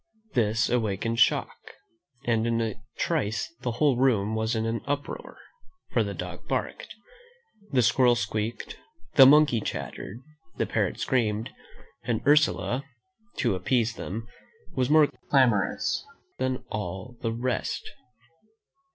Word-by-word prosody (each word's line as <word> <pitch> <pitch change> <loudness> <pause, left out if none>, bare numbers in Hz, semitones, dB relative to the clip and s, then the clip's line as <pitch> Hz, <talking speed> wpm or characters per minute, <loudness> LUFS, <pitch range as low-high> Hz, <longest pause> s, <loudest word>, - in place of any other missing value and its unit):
This 115 -1 +2
awakened 115 -1 0
Shock, - - +2 0.7
and 115 -1 +1
in 115 0 +1
a 110 -2 -3 0.2
trice 115 -11 -1
the 125 -2 -2
whole 135 +1 +2
room 110 -5 +2
was 110 +1 0
in 110 0 0
an 115 0 -1
uproar; 145 0 -4 0.5
for - - +2
the - - -4
dog - - -7
barked, - - -3 0.8
the 130 -4 +3
squirrel 120 +2 +4
squealed, 110 +2 -3 0.4
the 135 -3 +9
monkey 145 -5 +5
chattered, 100 +1 -5 0.4
the - - +1
parrot - - -1
screamed, 110 -3 0 0.5
and 115 -2 -2
Ursula, 145 -3 +3 0.5
to 120 -5 +1
appease 115 +5 +1
them, 115 +1 -6 0.5
was 130 -3 0
more 155 0 +7 0.2
clamorous 125 - +2 0.4
than 130 -1 -1
all 95 +4 -5
the 115 - -1
rest. 120 +1 -2
115 Hz, 125 wpm, -27 LUFS, 110-130 Hz, 0.8 s, the